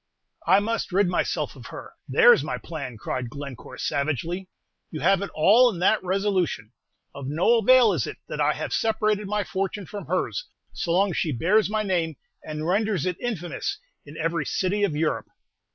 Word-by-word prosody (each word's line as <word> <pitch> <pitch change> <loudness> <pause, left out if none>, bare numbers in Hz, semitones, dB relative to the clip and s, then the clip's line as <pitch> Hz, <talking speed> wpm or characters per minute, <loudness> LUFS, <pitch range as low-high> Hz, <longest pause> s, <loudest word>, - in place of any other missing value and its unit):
"I 190 +3 +6
must 225 -1 -2
rid 195 +1 +3
myself 180 - -1
of - - -11
her! - - -10
There's 485 -1 +6
my - - -3
plan!" 140 -8 -7
cried 125 +3 -4
Glencore, 130 -2 -9
savagely. 160 +8 -2 0.4
"You 155 - -6
have 195 +2 +3
it 200 - -3
all 220 +11 +6
in 205 - -5
that 215 +3 +3
resolution. 185 - -1 0.4
Of 140 -2 -7
no 175 +11 +3
avail 240 -1 +6
is 145 - -1
it - - -7
that - - -4
I - - +3
have - - -4
separated 215 -2 +1
my 210 +1 0
fortune 195 +1 -3
from 200 +1 -8
hers, 185 - -2 0.3
so 170 - -3
long 190 +3 +3
as - - -4
she 160 - 0
bears 190 - +2
my 215 0 0
name, 170 -5 -1 0.3
and 155 0 -5
renders 200 -1 +1
it 180 -2 -2
infamous 220 - -3 0.3
in 145 +1 -12
every 165 -1 -1
city 200 +2 0
of 170 -7 +1
Europe. 155 +1 -1
185 Hz, 185 wpm, -25 LUFS, 155-210 Hz, 0.4 s, I